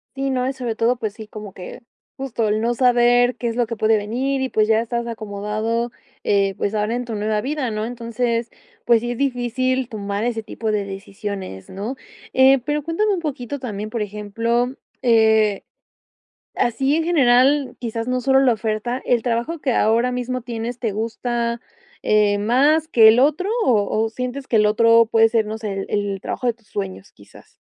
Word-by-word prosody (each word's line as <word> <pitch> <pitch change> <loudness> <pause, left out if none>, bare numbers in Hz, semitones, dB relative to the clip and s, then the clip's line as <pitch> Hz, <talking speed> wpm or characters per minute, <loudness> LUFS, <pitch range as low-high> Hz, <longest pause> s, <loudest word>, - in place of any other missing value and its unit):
Sí, 275 0 -2
no, 255 -1 0
y 265 - 0
sobre 250 -4 -4
todo, 235 +3 +1
pues 215 -3 -4
sí, 220 0 -9
como 210 -3 -9
que 190 +7 -10 0.3
justo 245 -5 -2
el 215 +1 +1
no 235 +2 +1
saber 245 0 +3
qué 240 - -3
es 230 - -2
lo 240 -1 +1
que 230 0 -6
puede 220 +1 +3
venir, 250 +6 -1
y, 265 - -1
pues, 215 -3 +2
ya 220 0 +3
estás 235 0 -3
acomodado, 215 +1 -3 0.4
eh, 195 -1 +2
pues, 205 - -1
ahora 210 +2 0
en 245 0 -3
tu 230 -2 -5
nueva 210 +1 0
vida, 265 0 -2
¿no?, 215 0 -2
entonces, 235 0 -2 0.3
pues 235 -1 +4
sí, 240 +2 -3
es 245 - -4
difícil 255 -1 0
tomar 205 -2 -3
ese 230 -2 -2
tipo 220 0 -4
de 210 -1 0
decisiones, 195 - -7
¿no?, 210 +7 -5 0.4
eh, 265 0 +6
pero 295 0 -1
cuéntame 400 +7 0
un 360 - -2
poquito 285 -3 -4
también, 215 -4 -5
por 225 0 -3
ejemplo, 230 +5 -1 0.3
eh, 220 -4 +3 0.9
así, 265 +5 +1
en 325 0 0
general, 270 -4 +3
quizás 230 -1 -4
no 255 0 0
solo 265 +1 +4
la 260 -3 +4
oferta, 225 +3 -2
¿el 240 -3 +1
trabajo 240 +7 -1
que 260 - 0
ahora 230 +4 +2
mismo 250 0 -3
tienes 235 0 -5
te 230 -4 -2
gusta, 235 +2 -2 0.4
eh, 210 -1 +3
más 280 +9 +3
que 230 -8 +6
el 220 +1 +7
otro?, 305 +8 +2 0.2
¿o 210 -5 +3 0.2
o 225 - -3
sientes 250 +3 -5
que 230 - +2
el 210 0 +4
otro 230 +1 +5
puede 225 0 +5
ser, 225 -1 +1
no 215 +1 -4
sé, 215 -2 -4
el 195 0 -4
el 200 -2 -2
trabajo 255 - -4
de 240 - +2
tus 225 -2 -31
sueños, 195 -1 -6
quizás? 100 - -18
235 Hz, 195 wpm, -21 LUFS, 215-250 Hz, 0.9 s, el